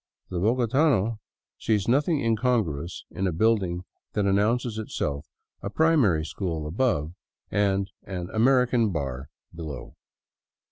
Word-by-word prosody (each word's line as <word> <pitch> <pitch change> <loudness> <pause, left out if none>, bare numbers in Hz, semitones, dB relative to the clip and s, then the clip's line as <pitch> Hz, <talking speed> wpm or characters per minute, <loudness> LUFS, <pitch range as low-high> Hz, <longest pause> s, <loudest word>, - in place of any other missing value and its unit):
The 90 - -1
bogotano 115 - +2 0.4
sees 105 -3 +1
nothing 145 +5 +2
incongruous 110 - 0
in 95 - -1
a - - +1
building 90 -1 +1 0.3
that 105 - +1
announces 110 +3 +1
Itself 75 -8 -3 0.3
a - - -3
"Primary 120 - +3
School" 80 -1 -3
above 80 - 0 0.4
and 100 -1 +1 0.2
an 90 -3 -4
"American 120 -1 +3
Bar'* 70 -4 -4 0.2
below. 80 -5 -7
105 Hz, 110 wpm, -26 LUFS, 85-120 Hz, 0.4 s, Primary